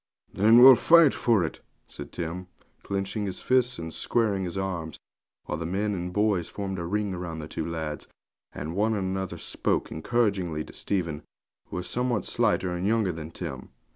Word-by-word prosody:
'Then 110 +4 +5
we'll 130 +2 +11
fight 165 +3 +6
for 115 -6 +2
it,' 80 - -4 0.3
said - - -9
Tim, 90 +2 -5 0.3
clenching 100 +1 -3
his 95 - -4
fists 125 -1 +2
and 80 -1 -6
squaring 100 +3 0
his 90 +2 -5
arms, 90 -5 -3 0.5
while 75 - -3
the 85 - -4
men 100 +4 -1
and 90 -1 -4
boys 100 -4 +1
formed 95 -2 -4
a 85 - -3
ring 100 0 -1
round 85 -2 -5
the 75 - -6
two 80 +1 -4
lads, 80 -2 -4 0.4
and 80 +3 -6
one 110 +2 +2
and 95 -2 -1
another 95 -1 -3
spoke - - -2
encouragingly 95 -4 0
to - - -13
Stephen, 85 -7 -2 0.5
who - - -8
was 90 0 -4
somewhat 120 -5 -1
slighter 95 - +1
and 90 +2 -2
younger 110 -3 +2
than 80 -2 -7
Tim. 80 -6 -7
95 Hz, 180 wpm, -27 LUFS, 85-105 Hz, 0.5 s, we'll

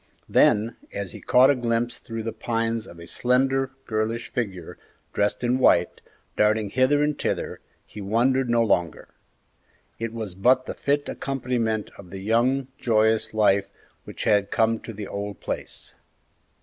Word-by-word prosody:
Then, 110 +3 +3
as 100 -2 -4
he - - -10
caught 130 +3 +5
a - - +2
glimpse 120 -1 -1
through 115 -1 -6
the 115 - -3
pines 115 -1 -2
of 85 - -12
a 85 - -10
slender, 130 +8 +1 0.2
girlish 110 +1 -2
figure, 95 -8 -4 0.3
dressed 105 +4 0
in 125 +2 +1
white, 90 -8 +3 0.3
darting 105 -1 +2
hither 130 +4 +3
and 150 0 +1
thither, - - -2 0.3
he 105 - -10
wondered 120 +5 +1
no 120 -1 +3
longer; 90 -7 0 0.9
it 115 -1 -3
was 110 -5 -5
but 125 +7 +3
the - - -4
fit 145 +1 0
accompaniment 120 -5 -2
of 95 -3 -12
the 95 - -7
young, 120 +6 +1
joyous 110 -1 +2
life 100 -2 +3 0.4
which - - -7
had 100 -1 +2
come 115 0 +2
to - - -8
the 105 -2 -7
old 100 0 -5
place. - - -6
115 Hz, 155 wpm, -24 LUFS, 105-125 Hz, 0.9 s, caught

